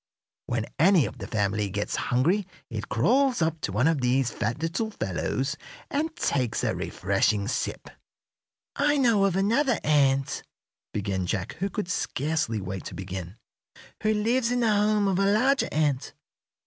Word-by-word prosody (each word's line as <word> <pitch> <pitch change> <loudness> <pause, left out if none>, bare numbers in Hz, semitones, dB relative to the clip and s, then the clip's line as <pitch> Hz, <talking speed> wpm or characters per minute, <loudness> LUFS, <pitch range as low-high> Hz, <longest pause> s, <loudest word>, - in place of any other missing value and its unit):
When 115 -2 -1
any 175 -2 +5
of 130 - -7
the 100 - -6
family 105 -1 0
gets 105 +2 -2
hungry 170 +11 +2 0.2
it 110 -2 -5
crawls 250 - +3
up 160 -1 0
to - - -2
one 115 +9 +2
of 160 -4 +1
these 125 -1 +2
fat 115 +6 -2
little 170 +7 -1
fellows 135 - -2 0.4
and 315 +3 -1
takes 130 - 0
a - - +1
refreshing 105 -2 0
sip." - - -3 0.9
"I 295 0 +2
know 230 -7 +4
of 190 -3 +1
another 230 +6 +2
ant," 135 -3 +2 0.5
began 95 -3 -2
Jack, 105 +4 -2
who 195 +2 -1
could 205 0 -3
scarcely 150 -9 -1
wait 95 -1 -5
to - - -7
begin, 95 +1 -6 0.6
"who 215 - +2
lives 230 +3 +1
in 245 0 +1
the 225 -2 +3
home 210 0 +2
of 190 -1 +1
a 195 - +3
larger 260 +6 +3
ant. 145 -4 0
150 Hz, 160 wpm, -26 LUFS, -, 0.9 s, any